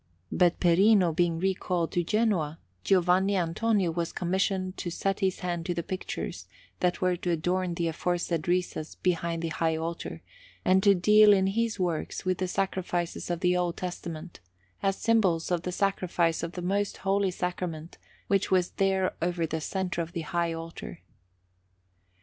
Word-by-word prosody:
But 175 -1 +3
Perino 180 0 +4
being 170 -1 +2
recalled 180 -2 -1
to 175 - +1
Genoa, 180 -6 +1 0.3
Giovanni 190 - +3
Antonio 185 +2 +1
was 170 0 -2
commissioned 185 +1 -1
to 175 - -3
set 195 +3 -1
his 190 -3 0
hand 175 -1 -3
to 175 - -1
the 170 - -2
pictures 185 +2 -5 0.3
that 180 -1 0
were 180 -1 +2
to 175 - -3
adorn 175 +2 0
the 170 0 -1
aforesaid 170 0 -1
recess 175 -3 -1
behind 170 -2 -1
the 165 - -1
high 160 0 0
altar, 165 +1 -5 0.4
and 190 +1 +4
to 200 0 +5
deal 210 +3 +6
in 190 -1 +3
his 220 +2 0
works 175 -2 -2
with 185 -1 0
the 185 - 0
sacrifices 180 -2 -2
of 175 0 -2
the 180 0 +3
Old 175 -1 0
Testament, 175 -2 -6 0.4
as 195 0 +1
symbols 190 -8 +2
of 175 -2 +1
the 180 - -4
Sacrifice 180 -4 0
of 170 +1 -4
the 180 - -5
Most 200 +2 0
Holy 195 0 +2
Sacrament, 175 -3 -4 0.3
which 195 -1 +1
was 180 -2 +2
there 190 -1 +1
over 170 -1 0
the 160 0 -3
centre 180 0 -2
of 165 +1 -6
the 170 - -2
high 170 +1 -1
altar. 165 - -7
180 Hz, 165 wpm, -28 LUFS, 170-190 Hz, 0.4 s, deal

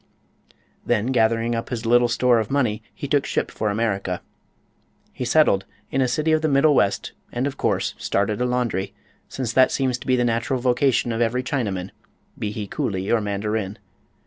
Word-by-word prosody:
Then, 120 +2 0
gathering 115 -1 +2
up 115 0 -3
his 120 -2 -4
little 120 +1 +4
store 120 0 +3
of 110 - -2
money, 125 -7 0
he - - -6
took - - +2
ship - - -2
for 105 - -2
America. 100 -4 -1 0.9
He 125 - -4
settled 120 -7 +4 0.3
in 135 - +1
a 130 - +3
city 155 +6 0
of 155 0 +3
the 160 - +1
middle 145 +1 +4
west 100 -7 +1 0.2
and 125 +2 -1
of 140 -1 -2
course - - 0
started 105 +3 0
a - - +2
laundry, 110 -6 -1 0.3
since 125 -4 -3
that 130 0 +5
seems 130 -2 0
to - - -11
be 130 - +4
the 125 -1 +1
natural 120 +3 0
vocation 125 0 +2
of 115 +1 -1
every 120 +2 +1
Chinaman, 100 -9 -2 0.5
be 105 - -2
he 105 -1 -5
coolie 95 0 -2
or 115 - +3
mandarin. 105 0 -2
120 Hz, 185 wpm, -23 LUFS, 105-130 Hz, 0.9 s, that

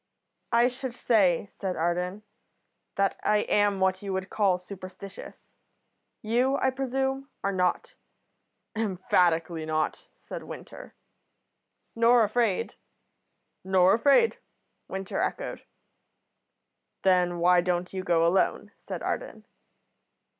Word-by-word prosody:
"I 235 +1 +5
should 255 -1 -5
say," 200 -8 +2
said 190 -3 -4
Arden, 180 +4 -2 0.7
"that 195 -1 0
I 210 0 +2
am 205 -2 +2
what 190 0 +1
you 200 -1 -5
would 190 0 -4
call 195 -4 +2
superstitious. 190 +1 -11 0.7
You, 250 +5 +2
I 265 - +1
presume, 270 +1 -2
are 200 - +1
not." 180 -2 -1 0.8
"Emphatically 175 -5 +1
not," 155 0 -2
said - - -8
Winter. - - -10 1.0
"Nor 230 +1 +5
afraid?" 215 -2 0 0.9
"Nor 190 0 +4
afraid," 280 - +4 0.5
Winter 190 0 -4
echoed. - - -3 1.4
"Then 180 -2 +3
why 175 +1 +4
don't 180 +1 -2
you 190 -1 -3
go 170 -3 +2
alone?" 180 +3 +1
said - - -7
Arden. - - -4
195 Hz, 105 wpm, -27 LUFS, 180-230 Hz, 1.4 s, I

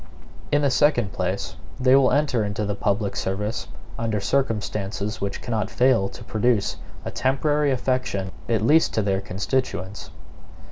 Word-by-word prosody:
In 145 0 +3
the 140 - +3
second 120 -8 +3
place, - - -3 0.2
they 130 +1 +5
will 135 -2 +5
enter 140 -6 +2
into 105 +1 -2
the 100 - -1
public 100 0 -1
service 105 +3 -2 0.3
under 110 -2 0
circumstances 105 -3 -1
which 100 0 -3
cannot 110 -4 -1
fail 125 -6 +3
to - - -11
produce 110 -2 +1 0.3
a - - -3
temporary 145 +3 +1
affection 125 -7 -1 0.2
at 110 -2 +1
least 155 +7 +4
to 110 - +2
their 95 -1 +1
constituents. 100 -1 -3
110 Hz, 145 wpm, -24 LUFS, 100-130 Hz, 0.3 s, they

